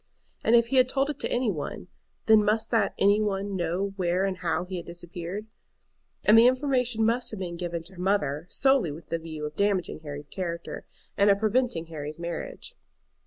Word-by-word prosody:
And 230 - +5
if 235 0 +4
he 270 - +2
had 255 0 +5
told 275 +2 +1
it 290 - -10
to - - -3
any 245 -3 +1
one, 155 +1 -5 0.4
then 220 -1 +6
must 220 +2 +1
that 220 -4 +2
"any 205 +2 +4
one" 200 -1 -1
know 180 +3 -1
where 180 +1 +1
and 190 -1 -2
how 175 0 -1
he 185 0 -5
had 170 - -6
disappeared. 175 +3 -6 0.8
And 210 - +7
the 230 +2 +8
information 250 -4 +1
must 235 +2 +2
have 215 - -6
been 175 -2 -4
given 170 -1 -4
to 185 +4 -13
her 180 - -9
mother 170 -5 0
solely 265 - +3
with 155 +2 -10
the 165 - -1
view 160 -2 -6
of 150 0 -6
damaging 195 -5 0
Harry's 145 -1 -7
character, 170 +1 -5 0.3
and 200 +1 +5
of 200 - +5
preventing 220 -4 0
Harry's 155 -2 -6
marriage. 175 - -6
195 Hz, 200 wpm, -27 LUFS, 170-225 Hz, 0.8 s, the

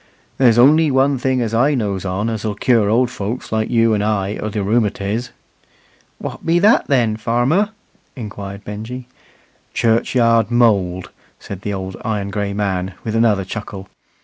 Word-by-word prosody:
"There's 120 -4 +5
only 150 +6 +5
one 135 0 +2
thing 130 0 0
as 115 -2 -2
I 135 +6 +3
knows 100 -6 -2
on 95 +4 -2
as'll 110 -2 -3
cure 110 -2 +2
old 120 +3 +2
folks 110 +4 -5
like 110 0 0
you 115 -1 +3
and 105 -1 0
I 105 -1 -1
o' 105 - -4
th' 105 - -11
rheumatiz." 105 +1 -1 0.9
"Wot - - -7
be 170 +1 +2
that 205 +6 +4
then, 120 -6 +2
farmer?" 120 - +1 0.5
inquired 100 -3 -7
Benjy. 115 +5 -7 0.7
"Churchyard 115 0 +2
mould," 100 -7 +1 0.3
said 100 -2 -8
the 100 0 -3
old 95 -1 -6
iron 105 -3 -2
gray 100 -1 -2
man, 95 -2 -2
with 110 -1 -3
another 110 -4 +2
chuckle. 100 -1 -7
110 Hz, 155 wpm, -18 LUFS, 100-120 Hz, 0.9 s, There's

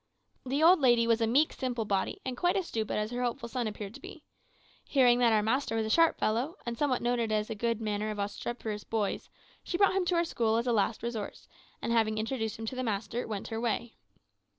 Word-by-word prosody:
The 280 +4 +1
old 355 +2 +7
lady 240 -4 +4
was 230 0 +2
a 225 - +3
meek, 280 +7 +3
simple 245 -4 -2
body, 195 -2 -1
and 260 -1 -3
quite 355 +6 +1
as 380 - -1
stupid 220 -2 -2
as 210 +1 -2
her 245 0 -3
hopeful 235 -1 -2
son 240 -1 -2
appeared 210 -1 -6
to - - -10
be. - - -11 0.6
Hearing 250 -3 +4
that 240 -2 +4
our 215 -1 +3
master 230 +1 0
was 220 -1 0
a 220 - -2
sharp 330 +3 +4
fellow, 245 - 0
and 235 -1 -3
somewhat 260 -1 0
noted 240 -2 0
as 215 +1 0
a - - 0
good 230 +1 -1
manager 215 -1 -2
of 210 - -4
obstreperous 210 +1 -4
boys, 215 -3 -2 0.3
she 345 - -2
brought 400 0 +4
him 380 -1 +1
to 350 - +1
our 340 0 +2
school 225 -8 +1
as 235 - 0
a 245 - +1
last 215 +1 0
resource, 230 -3 -5 0.4
and - - -1
having 220 -2 +2
introduced 220 0 -2
him 225 - -6
to 240 - -4
the 255 - -2
master, 225 +1 -2
went 210 -3 -5
her 225 0 -3
way. 235 0 -2
230 Hz, 235 wpm, -30 LUFS, 220-255 Hz, 0.6 s, old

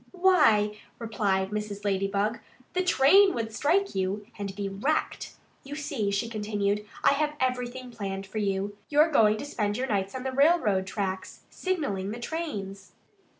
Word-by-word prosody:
"Why," 220 - +4 0.2
replied 200 -4 -1
Mrs. 210 -1 -4
Ladybug, 200 +2 0 0.3
"the 370 - +1
train 370 +3 +5
would 225 -1 -3
strike 350 - +1
you 195 +2 -2
and 200 -2 -5
be 200 0 -3
wrecked. 210 +11 -2 0.3
You 280 +2 -7
see," 280 -8 -2
she 200 +3 -1
continued, 210 -2 -1 0.2
"I - - +6
have 300 +1 0
everything 250 0 -2
planned 195 -4 -5
for 215 +3 -5
you. 200 0 -1
You're 305 +2 +4
going 215 -6 +4
to 250 - -5
spend 210 -7 -2
your 255 - -1
nights 195 -2 -1
on 255 - -4
the 265 - -2
railroad 260 - +3
tracks, 190 -1 -4
signalling 280 - -2
the 225 +3 -5
trains." 210 - -5
215 Hz, 155 wpm, -27 LUFS, 200-280 Hz, 0.3 s, I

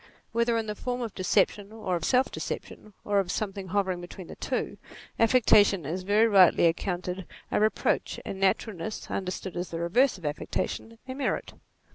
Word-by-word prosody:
Whether 235 0 +2
in 225 - -1
the 210 - -3
form 250 +3 -3
of 225 -4 -4
deception 200 +2 +1
or 215 -5 -2
of 165 -2 -2
self 255 +1 +3
deception, 215 - -6
or 205 -1 +2
of 185 -2 -1
something 195 -2 -3
hovering 190 -2 0
between 175 +1 -9
the - - -10
two, - - -3 0.4
affectation 215 - +5
is 170 +6 -3
very 205 +4 +4
rightly 190 -5 +6
accounted 180 +1 -1 0.2
a - - +2
reproach, 215 +1 +1
and 190 - -5
naturalness, 195 0 -1
understood 185 -1 -4
as 175 0 -3
the 165 - -4
reverse 200 +10 +3
of 175 - -11
affectation, 225 +9 -3
a 260 - -4
merit. 270 0 -2
195 Hz, 170 wpm, -28 LUFS, 180-220 Hz, 0.4 s, rightly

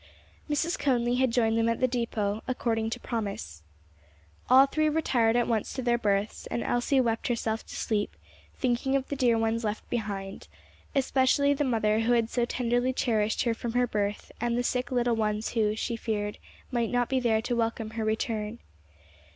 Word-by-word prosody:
Mrs. 315 +4 0
Conly 245 -3 +1
had 260 0 +3
joined 230 -1 +2
them 230 0 +2
at 230 - 0
the 255 - +3
depôt, 225 -4 -1
according 225 -3 -1
to - - -4
promise. 200 - -4 0.9
All 260 +2 +8
three 310 +2 +1
retired 245 -7 +2
at 240 -1 +2
once 225 -3 -1
to 260 - -4
their 240 -1 +2
berths, 205 -1 -1
and 235 - -2
Elsie 245 +3 +1
wept 230 -3 0
herself 225 -2 -1
to - - -9
sleep, 210 -2 -1 0.4
thinking 255 +1 0
of 270 -1 0
the 285 - -2
dear 245 -4 +3
ones 225 +1 0
left 210 0 -3
behind; 200 -4 -4 0.5
especially 275 +1 +3
the 285 - 0
mother 220 -4 +2
who 230 +2 +2
had 230 -1 +1
so 240 -1 +1
tenderly 245 +1 0
cherished 220 -4 +1
her 235 - +1
from 230 0 -5
her 245 0 +3
birth 205 -3 -2
and 240 0 0
the 245 - +1
sick 250 0 -1
little 240 -2 +2
ones 215 0 -1
who, 215 -2 +1
she 235 +2 -2
feared, 210 -2 -3 0.3
might 235 -3 0
not 245 -1 +1
be 265 - +1
there 230 -3 +2
to 245 - -1
welcome 225 -1 -1
her 225 0 -3
return. 220 0 -2
235 Hz, 185 wpm, -28 LUFS, 220-250 Hz, 0.9 s, All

